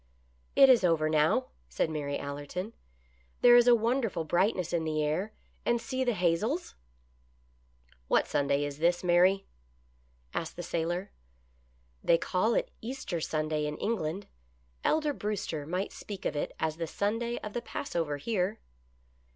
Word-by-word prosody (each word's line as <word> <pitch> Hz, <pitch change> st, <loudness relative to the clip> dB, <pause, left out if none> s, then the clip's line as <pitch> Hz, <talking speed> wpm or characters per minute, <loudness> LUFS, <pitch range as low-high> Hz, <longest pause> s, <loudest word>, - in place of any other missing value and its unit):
" -, -, -37 dB
It 275 Hz, -, +8 dB
is 250 Hz, -6 st, +6 dB
over 160 Hz, -3 st, +3 dB
now," 155 Hz, +12 st, +2 dB, 0.2 s
said 160 Hz, -, -1 dB
Mary 145 Hz, -2 st, -2 dB
Allerton. 145 Hz, +9 st, -5 dB, 0.3 s
" -, -, -36 dB
There 240 Hz, 0 st, +8 dB
is 240 Hz, 0 st, +6 dB
a 245 Hz, -, +8 dB
wonderful 230 Hz, -6 st, 0 dB
brightness 175 Hz, +2 st, +1 dB
in 170 Hz, -2 st, +1 dB
the 155 Hz, -1 st, 0 dB
air, 160 Hz, +8 st, -1 dB, 0.3 s
and 240 Hz, 0 st, +2 dB
see 260 Hz, +2 st, -2 dB
the 245 Hz, -3 st, +1 dB
hazels! 200 Hz, -, 0 dB, 0.5 s
" 60 Hz, 0 st, -37 dB
" 60 Hz, 0 st, -34 dB
What -, -, +3 dB
Sunday 140 Hz, 0 st, +1 dB
is 145 Hz, 0 st, -6 dB
this, 175 Hz, +2 st, +2 dB
Mary 185 Hz, +2 st, +4 dB, 0.3 s
} 60 Hz, +1 st, -37 dB
" 60 Hz, +1 st, -37 dB
asked 165 Hz, -, -3 dB
the 175 Hz, -, -6 dB
sailor. 175 Hz, +3 st, -2 dB, 0.5 s
" 60 Hz, 0 st, -37 dB
They 170 Hz, -, +5 dB
call 190 Hz, +7 st, +1 dB
it -, -, 0 dB
Easter 225 Hz, -8 st, -4 dB
Sunday 155 Hz, -1 st, -1 dB
in 150 Hz, -, -4 dB
England. 195 Hz, -3 st, -2 dB, 0.6 s
Elder 305 Hz, -2 st, +2 dB
Brewster 195 Hz, -, -3 dB
might 185 Hz, +4 st, -2 dB
speak 200 Hz, -2 st, -8 dB
of 150 Hz, -, -1 dB
it 145 Hz, -, -3 dB
as 160 Hz, 0 st, -1 dB
the 165 Hz, -1 st, -3 dB
Sunday 230 Hz, +7 st, -1 dB
of 210 Hz, -, -6 dB
the 240 Hz, -, -2 dB
Pass 235 Hz, -, -6 dB
over 155 Hz, -4 st, 0 dB
here." 200 Hz, +4 st, -1 dB
170 Hz, 170 wpm, -30 LUFS, 145-210 Hz, 0.6 s, It